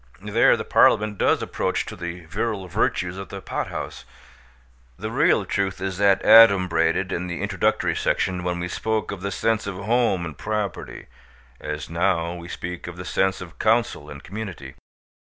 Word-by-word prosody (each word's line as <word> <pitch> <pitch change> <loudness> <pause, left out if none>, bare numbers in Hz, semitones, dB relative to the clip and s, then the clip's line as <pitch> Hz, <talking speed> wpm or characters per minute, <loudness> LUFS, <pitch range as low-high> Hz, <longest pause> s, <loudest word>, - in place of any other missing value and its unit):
There - - +4
the - - -5
Parliament 105 -1 +3
does - - +2
approach - - -1
to - - -8
the 85 -1 -7
virile 95 +3 -3
virtues 90 -1 -1
of 95 - -8
the - - -6
pothouse. - - -5 0.9
The - - -5
real - - +3
truth 95 -2 -1
is 95 -1 -4
that 100 -1 +4
adumbrated 95 -5 +5
in 90 +1 -2
the 85 -1 -4
introductory - - 0
section 90 -1 0
when 90 -1 -2
we 90 - -3
spoke 110 +4 -2
of 100 -3 -6
the 100 - -2
sense 110 +2 0
of 100 - -4
home 105 -3 +1
and 80 -3 -7
property, 105 -4 -4 0.5
as 75 -1 -5
now 85 0 0
we 85 -1 -8
speak 90 0 -6
of 85 0 -8
the 90 - -7
sense 95 +1 0
of 85 -3 -11
counsel 110 -9 +1
and 70 -1 -10
community. 95 -10 -7
95 Hz, 170 wpm, -23 LUFS, 85-100 Hz, 0.9 s, adumbrated